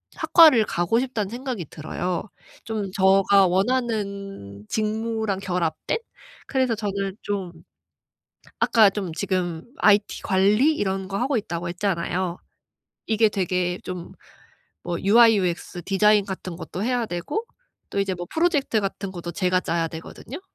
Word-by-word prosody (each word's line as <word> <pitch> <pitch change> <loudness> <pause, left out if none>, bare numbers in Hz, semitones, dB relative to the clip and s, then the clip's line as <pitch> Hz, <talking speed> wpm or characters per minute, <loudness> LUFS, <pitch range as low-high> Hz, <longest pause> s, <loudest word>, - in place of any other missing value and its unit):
학과를 320 -8 +6
가고 175 +6 +1
싶다는 245 -6 -2
생각이 240 - -5
들어요. 170 +3 -3 0.4
좀 210 -4 -3
저가 195 0 +4
원하는 200 - -2
직무랑 220 -1 -1
결합된? 180 - -1 0.5
그래서 260 -3 +1
저는 200 -2 -3
좀 195 -4 -3 1.1
아까 220 -3 +5
좀 195 -4 -4
지금 175 -3 -2
IT 205 -1 +3
관리 210 +10 +3
이런 190 -6 -2
거 195 +1 -3
하고 260 +1 +1
있다고 170 -5 -4
했잖아요. 180 -1 -2 0.7
이게 220 0 +4
되게 180 -2 -1
좀 180 -2 -7 0.7
뭐 175 -1 -2
UI, 225 +2 +6
UX 175 -1 -2
디자인 210 +1 +4
같은 190 -2 -6
것도 185 +2 -5
해야 245 0 0
되고 200 - -3 0.4
또 200 - -2
이제 195 -1 -1
뭐 175 0 -6
프로젝트 300 - +1
같은 195 0 -4
것도 175 -1 -6
제가 185 +1 +1
짜야 165 -2 -1
되거든요. 170 - -9
195 Hz, 275 characters per minute, -24 LUFS, 180-220 Hz, 1.1 s, 학과를